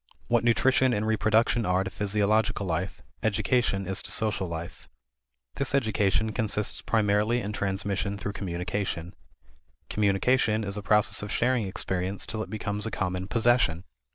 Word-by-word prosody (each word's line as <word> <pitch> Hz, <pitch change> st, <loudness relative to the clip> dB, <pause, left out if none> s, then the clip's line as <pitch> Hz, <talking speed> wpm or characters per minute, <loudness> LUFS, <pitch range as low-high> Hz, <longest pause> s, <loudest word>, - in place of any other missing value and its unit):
What 120 Hz, -1 st, +3 dB
nutrition 130 Hz, +2 st, +3 dB
and 105 Hz, +1 st, -1 dB
reproduction 110 Hz, +2 st, +2 dB
are 90 Hz, -1 st, +1 dB
to 95 Hz, -, -5 dB
physiological 105 Hz, +1 st, +1 dB
life, 90 Hz, +2 st, -3 dB, 0.2 s
education 110 Hz, -1 st, +1 dB
is 95 Hz, +1 st, -1 dB
to -, -, -6 dB
social 105 Hz, -3 st, +1 dB
life. 85 Hz, 0 st, -7 dB, 0.7 s
This 140 Hz, 0 st, 0 dB
education 110 Hz, -3 st, +1 dB
consists 105 Hz, -2 st, -1 dB
primarily 105 Hz, +2 st, +2 dB
in 105 Hz, -2 st, -4 dB
transmission 100 Hz, 0 st, -2 dB
through 100 Hz, 0 st, -4 dB
communication. 90 Hz, -1 st, -3 dB, 0.8 s
Communication 105 Hz, +2 st, +2 dB
is 100 Hz, -1 st, -3 dB
a 105 Hz, -, -3 dB
process 105 Hz, +1 st, +3 dB
of 105 Hz, 0 st, -6 dB
sharing 120 Hz, -3 st, +1 dB
experience 95 Hz, 0 st, -2 dB
till 110 Hz, -1 st, -4 dB
it -, -, -5 dB
becomes 105 Hz, 0 st, -3 dB
a -, -, -1 dB
common 90 Hz, -3 st, -3 dB
possession. 115 Hz, -7 st, +2 dB
105 Hz, 145 wpm, -27 LUFS, 95-110 Hz, 0.8 s, What